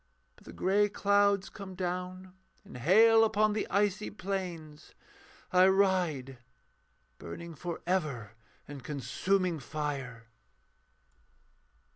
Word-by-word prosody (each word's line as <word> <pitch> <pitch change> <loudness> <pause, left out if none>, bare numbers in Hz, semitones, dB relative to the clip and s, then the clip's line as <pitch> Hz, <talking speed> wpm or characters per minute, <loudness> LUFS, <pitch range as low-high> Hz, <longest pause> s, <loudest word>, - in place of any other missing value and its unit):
But - - -22
the - - -10
grey 205 +2 +2
clouds 200 -1 +2
come 195 -2 -9
down 180 0 -4 0.3
In - - -13
hail 220 - +5
upon 215 -1 +2
the 210 - -2
icy 205 +1 0
plains: 180 -7 -6 0.6
I 185 +1 +6
ride, 180 -10 +1 0.8
Burning 170 - -8
for 170 +2 -6
ever 150 - -1 0.4
in 145 -2 -8
consuming 170 +6 -1
fire. 135 -4 -5
180 Hz, 100 wpm, -30 LUFS, 150-200 Hz, 0.8 s, I